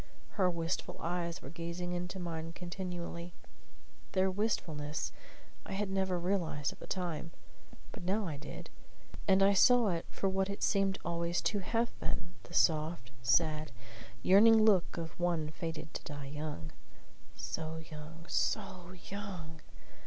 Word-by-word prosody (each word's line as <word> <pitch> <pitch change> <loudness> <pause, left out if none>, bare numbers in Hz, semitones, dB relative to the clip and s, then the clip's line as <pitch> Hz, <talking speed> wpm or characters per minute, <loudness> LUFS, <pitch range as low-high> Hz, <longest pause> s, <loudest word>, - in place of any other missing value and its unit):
Her 185 -3 +3
wistful 165 -1 -2
eyes 170 0 -2
were 135 - -7
gazing 170 +1 -4
into 180 +1 -3
mine 165 -2 -4
continually. 175 -1 -5 0.8
Their 190 0 +3
wistfulness 160 -8 -1 0.5
I - - -6
had 195 0 -1
never 190 -1 +1
realized 170 -5 0
at - - -19
the - - -9
time; 170 -3 -2 0.6
but - - -8
now 200 +4 +1
I 155 -5 -3
did; 145 +1 -8 0.6
and 190 0 +6
I 200 +1 +6
saw 240 +2 +6
it 170 -2 -1
for 195 - -1
what 190 0 +1
it 200 - -3
seemed 195 -1 +3
always 170 0 0
to 205 - +2
have 230 +4 +1
been, 175 0 -3
the - - -13
soft, 155 -6 +3
sad, 155 +5 +3 0.5
yearning 215 +3 +8
look 195 -6 +4
of 165 0 -5
one 170 -3 +1
fated 160 0 -5
to - - -5
die 145 -2 -6
young. 150 - -4 0.6
So 160 0 -3
young 160 +1 -9
so 185 -4 -1 0.2
young! 180 -6 -6
175 Hz, 145 wpm, -34 LUFS, 160-190 Hz, 0.8 s, yearning